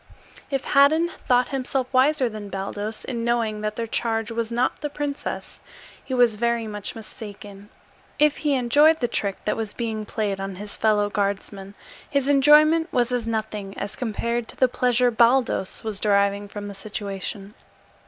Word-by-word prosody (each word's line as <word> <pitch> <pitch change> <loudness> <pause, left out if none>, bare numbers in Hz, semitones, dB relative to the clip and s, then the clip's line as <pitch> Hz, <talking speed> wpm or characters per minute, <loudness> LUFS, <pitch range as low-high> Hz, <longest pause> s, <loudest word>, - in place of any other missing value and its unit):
If 275 -1 -2
Haddan 315 +5 +4 0.2
thought 245 0 +3
himself 265 -1 -2
wiser 265 +1 +3
than 215 -2 -7
Baldos 205 +3 -5
in 235 -3 -3
knowing 230 -3 0
that 215 0 -2
their 230 - -2
charge 225 0 -1
was 230 0 -2
not 240 +2 0
the 295 - -2
princess, 290 0 -5 0.4
he 260 - -3
was 240 -4 +4
very 235 0 0
much 210 -2 -6
mistaken; 205 -2 -10 0.5
if 300 0 +3
he 295 -3 +1
enjoyed 290 +6 +4
the 240 - +1
trick 200 -4 -2
that - - +1
was 220 -2 -4
being 220 -2 -3
played 205 -3 -2
on 195 0 -4
his 205 +2 -5
fellow 210 -2 +2
guardsman, 200 -1 -3 0.3
his 280 -1 +1
enjoyment 305 +4 +5
was 245 -1 +1
as 245 -2 -1
nothing 215 -3 -4
as 200 0 -3
compared 235 0 -2
to - - -8
the 255 - +4
pleasure 250 0 +2
Baldos 235 -4 +2
was 215 -3 -3
deriving 200 -1 +2
from 205 0 -7
the 200 - -7
situation. 200 0 -5
230 Hz, 165 wpm, -24 LUFS, 205-255 Hz, 0.5 s, enjoyment